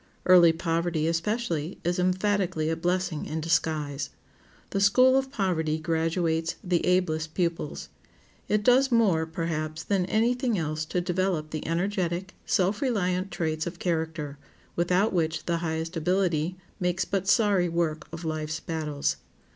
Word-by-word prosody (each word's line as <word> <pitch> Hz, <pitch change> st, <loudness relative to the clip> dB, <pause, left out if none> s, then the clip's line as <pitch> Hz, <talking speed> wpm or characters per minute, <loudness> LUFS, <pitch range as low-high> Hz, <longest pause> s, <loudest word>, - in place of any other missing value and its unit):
Early 175 Hz, -2 st, +7 dB
poverty, 165 Hz, -1 st, -1 dB
especially, 165 Hz, -1 st, -1 dB
is 175 Hz, +2 st, 0 dB
emphatically 185 Hz, -3 st, +1 dB
a -, -, 0 dB
blessing 175 Hz, -1 st, -1 dB
in 160 Hz, -, -3 dB
disguise. 155 Hz, -3 st, 0 dB, 0.6 s
The 195 Hz, -, 0 dB
school 255 Hz, +6 st, +5 dB
of 265 Hz, 0 st, +1 dB
poverty 170 Hz, -, 0 dB
graduates 165 Hz, 0 st, 0 dB
the 180 Hz, -3 st, +1 dB
ablest 160 Hz, -4 st, +1 dB
pupils. 170 Hz, -4 st, -2 dB, 0.6 s
It 210 Hz, 0 st, +1 dB
does 260 Hz, +4 st, +4 dB
more, 190 Hz, -9 st, +3 dB
perhaps, 160 Hz, -1 st, -3 dB
than 190 Hz, -3 st, 0 dB
any 225 Hz, +5 st, +2 dB
thing 245 Hz, -3 st, -1 dB
else 155 Hz, -1 st, -2 dB
to 180 Hz, +3 st, -1 dB
develop 180 Hz, -3 st, -1 dB
the 155 Hz, -, -4 dB
energetic, 180 Hz, +1 st, -1 dB
self 195 Hz, +4 st, +1 dB
reliant 190 Hz, -7 st, 0 dB
traits 160 Hz, -2 st, -2 dB
of 175 Hz, 0 st, -6 dB
character, 160 Hz, -4 st, -2 dB, 0.4 s
without 180 Hz, +5 st, +2 dB
which 160 Hz, -3 st, 0 dB
the 170 Hz, -1 st, 0 dB
highest 165 Hz, +1 st, -3 dB
ability 175 Hz, 0 st, 0 dB, 0.2 s
makes 180 Hz, 0 st, 0 dB
but 195 Hz, -1 st, -2 dB
sorry 205 Hz, -5 st, +3 dB
work 165 Hz, -2 st, -1 dB
of 165 Hz, +1 st, -7 dB
life's 155 Hz, 0 st, -3 dB
battles. 155 Hz, -4 st, -2 dB
170 Hz, 140 wpm, -27 LUFS, 160-190 Hz, 0.6 s, Early